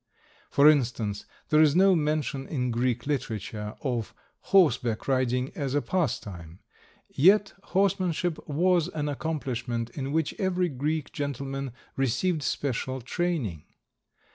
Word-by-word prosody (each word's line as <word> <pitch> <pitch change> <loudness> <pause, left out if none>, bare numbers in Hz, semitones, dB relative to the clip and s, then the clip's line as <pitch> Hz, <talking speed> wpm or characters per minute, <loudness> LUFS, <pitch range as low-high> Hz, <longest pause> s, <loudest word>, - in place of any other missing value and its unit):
For 140 +1 +5
instance, 120 -8 +2 0.2
there 155 0 +5
is 150 -1 +5
no 190 +1 +6
mention 150 -4 -1
in 125 -4 -1
Greek 120 0 0
literature 105 -6 -3
of 120 -6 -3 0.3
horseback 125 - +3
riding 130 -1 +1
as 140 -1 -2
a 145 - +2
pastime, 100 - -3 0.5
yet 200 +7 +4
horsemanship 180 -3 0
was 170 +2 +2
an 150 -4 -3
accomplishment 125 -6 -3
in 135 0 -4
which 160 -1 0
every 185 -2 +1
Greek 150 +2 -2
gentleman 140 -1 -4 0.2
received 150 +6 0
special 130 -1 -2
training. 130 - -2
140 Hz, 115 wpm, -27 LUFS, 120-160 Hz, 0.5 s, no